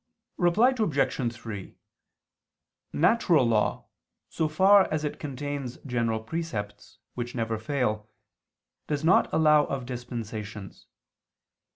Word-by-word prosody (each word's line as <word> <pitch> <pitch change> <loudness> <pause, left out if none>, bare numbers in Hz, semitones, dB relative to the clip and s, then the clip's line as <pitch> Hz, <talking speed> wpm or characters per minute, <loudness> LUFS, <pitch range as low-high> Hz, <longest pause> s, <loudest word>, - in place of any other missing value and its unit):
Reply 210 +9 +4
Obj. 140 - 0
3: 110 -4 -8 1.2
Natural 170 - +3
law, 110 -2 +1 0.4
so 160 - -1
far 190 +5 +5
as 155 -1 -1
it 150 - -4
contains 140 -2 -5
general 115 -4 -1
precepts, 110 -7 -5 0.2
which 120 0 -5
never 115 -2 -2
fail, 110 -4 -2 0.8
does 150 0 -2
not 170 +3 +4
allow 150 -2 +4
of 135 -2 -4
dispensations. 110 -5 -7
130 Hz, 100 wpm, -27 LUFS, 110-155 Hz, 1.2 s, far